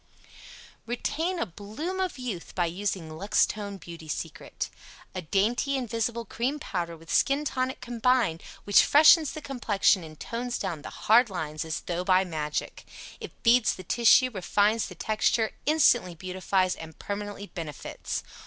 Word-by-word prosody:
Retain 325 Hz, +9 st, -2 dB
a -, -, 0 dB
"Bloom 215 Hz, -, -6 dB
of 370 Hz, -5 st, -1 dB
Youth" 235 Hz, -9 st, -6 dB
By 175 Hz, -, +2 dB
Using 180 Hz, 0 st, -3 dB
Luxtone 200 Hz, +3 st, 0 dB
Beauty 170 Hz, -2 st, -10 dB
Secret 150 Hz, -, -5 dB, 0.4 s
A 185 Hz, -, -4 dB
dainty 220 Hz, -, +1 dB
invisible 235 Hz, -1 st, -2 dB
CREAM 250 Hz, +7 st, -2 dB
POWDER 175 Hz, -, -4 dB
and 165 Hz, 0 st, -14 dB
SKIN 275 Hz, -, +2 dB
TONIC 260 Hz, -2 st, -2 dB
combined, 240 Hz, -7 st, +1 dB, 0.2 s
which 205 Hz, -, +6 dB
freshens 310 Hz, +1 st, +6 dB
the 310 Hz, -, -7 dB
complexion 215 Hz, -7 st, +2 dB
and 155 Hz, -1 st, -11 dB
tones 240 Hz, +1 st, -3 dB
down 170 Hz, -6 st, -4 dB
the -, -, -7 dB
HARD 230 Hz, +2 st, +4 dB
LINES 155 Hz, -5 st, -4 dB
as 160 Hz, 0 st, -3 dB
tho' 175 Hz, 0 st, -3 dB
by 185 Hz, 0 st, +4 dB
magic. 155 Hz, -4 st, -4 dB, 0.4 s
It -, -, -7 dB
FEEDS 240 Hz, 0 st, +4 dB
the 185 Hz, -, -9 dB
tissue, 240 Hz, +6 st, +5 dB
REFINES 205 Hz, +2 st, +1 dB
the -, -, -10 dB
texture, 220 Hz, +1 st, +1 dB, 0.2 s
INSTANTLY 245 Hz, -, +4 dB
beautifies, 185 Hz, +1 st, 0 dB
and 160 Hz, -1 st, -10 dB
PERMANENTLY 205 Hz, 0 st, -6 dB
benefits. 160 Hz, -6 st, -5 dB
205 Hz, 145 wpm, -27 LUFS, 175-245 Hz, 0.4 s, which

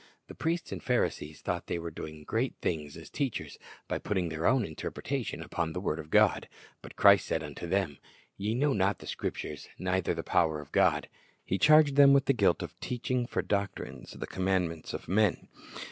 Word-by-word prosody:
The -, -, -11 dB
priests 165 Hz, +1 st, -2 dB
and -, -, -5 dB
Pharisees 80 Hz, -, -1 dB
thought 90 Hz, -1 st, -3 dB
they -, -, -1 dB
were 85 Hz, 0 st, -5 dB
doing 75 Hz, 0 st, -8 dB
great 115 Hz, -, -1 dB
things 75 Hz, -3 st, -3 dB
as 80 Hz, -, -10 dB
teachers, 135 Hz, -6 st, -3 dB, 0.3 s
by -, -, -2 dB
putting 95 Hz, -4 st, -1 dB
their 80 Hz, +1 st, -1 dB
own 130 Hz, -3 st, +3 dB
interpretation 80 Hz, -, -4 dB
upon 85 Hz, -2 st, -2 dB
the 90 Hz, -, -3 dB
word 85 Hz, -4 st, -2 dB
of 75 Hz, -, -8 dB
God; -, -, +3 dB, 0.3 s
but -, -, -11 dB
Christ 100 Hz, -2 st, +6 dB
said 80 Hz, -, -1 dB
of 75 Hz, -2 st, -7 dB, 0.2 s
them, 95 Hz, -7 st, 0 dB, 0.4 s
"Ye 105 Hz, +3 st, -2 dB
know 140 Hz, +2 st, +2 dB
not 100 Hz, -2 st, +1 dB
the -, -, -12 dB
Scriptures, 75 Hz, -2 st, -5 dB
neither 90 Hz, -1 st, 0 dB
the 85 Hz, -, -4 dB
power 80 Hz, -3 st, +2 dB
of 75 Hz, -1 st, -11 dB
God."^ -, -, +3 dB, 0.4 s
He 95 Hz, -, -1 dB
charged 150 Hz, -2 st, +6 dB
them 140 Hz, -1 st, +8 dB
with 140 Hz, 0 st, +4 dB
the 135 Hz, -, +3 dB
guilt 125 Hz, -, +2 dB
of -, -, -9 dB
"teaching 125 Hz, 0 st, -2 dB
for -, -, -1 dB
doctrines 100 Hz, -1 st, -3 dB
the -, -, -6 dB
com 95 Hz, -, -4 dB
mandments 90 Hz, -4 st, 0 dB
of -, -, -7 dB
men." 100 Hz, +1 st, +2 dB
95 Hz, 195 wpm, -30 LUFS, 80-125 Hz, 0.4 s, them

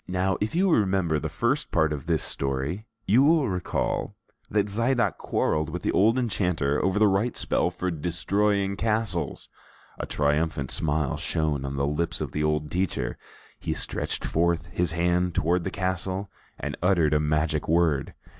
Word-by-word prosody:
Now, 95 Hz, +1 st, 0 dB
if 110 Hz, +8 st, -1 dB
you 190 Hz, +1 st, +3 dB
remember 95 Hz, -, +2 dB
the 80 Hz, -, -3 dB
first 120 Hz, -, 0 dB
part 80 Hz, -2 st, +2 dB
of 70 Hz, -1 st, -6 dB
this 80 Hz, -3 st, +1 dB
story, 70 Hz, +10 st, -2 dB, 0.2 s
you 115 Hz, +7 st, +5 dB
will 150 Hz, 0 st, +4 dB
recall 95 Hz, +1 st, -2 dB, 0.3 s
that 105 Hz, -2 st, +2 dB
Zidoc 120 Hz, +4 st, +1 dB
quarreled 75 Hz, 0 st, 0 dB
with 90 Hz, +2 st, -5 dB
the -, -, +1 dB
old 110 Hz, +5 st, +4 dB
enchanter 90 Hz, -, 0 dB
over 95 Hz, +2 st, +1 dB
the 105 Hz, -, +5 dB
right 105 Hz, +5 st, +1 dB
spell -, -, +1 dB
for 90 Hz, 0 st, -3 dB
destroying 100 Hz, +5 st, 0 dB
castles. 105 Hz, -8 st, -1 dB, 0.5 s
A -, -, -3 dB
triumphant 75 Hz, -1 st, 0 dB
smile 75 Hz, -2 st, 0 dB
shone 75 Hz, -4 st, -1 dB
on 70 Hz, 0 st, -4 dB
the 70 Hz, 0 st, 0 dB
lips 75 Hz, +4 st, -1 dB
of -, -, -3 dB
the 75 Hz, -, -1 dB
old 75 Hz, -1 st, 0 dB
teacher; 90 Hz, 0 st, -1 dB, 0.4 s
he -, -, -2 dB
stretched -, -, -3 dB
forth 85 Hz, 0 st, +1 dB
his 90 Hz, -2 st, -1 dB
hand 90 Hz, +1 st, +1 dB
toward 85 Hz, +2 st, +1 dB
the -, -, 0 dB
castle 95 Hz, +1 st, -2 dB, 0.3 s
and -, -, -4 dB
uttered 85 Hz, -4 st, +3 dB
a 75 Hz, -, +4 dB
magic 75 Hz, 0 st, 0 dB
word. 80 Hz, -4 st, +2 dB
90 Hz, 165 wpm, -26 LUFS, 75-100 Hz, 0.5 s, you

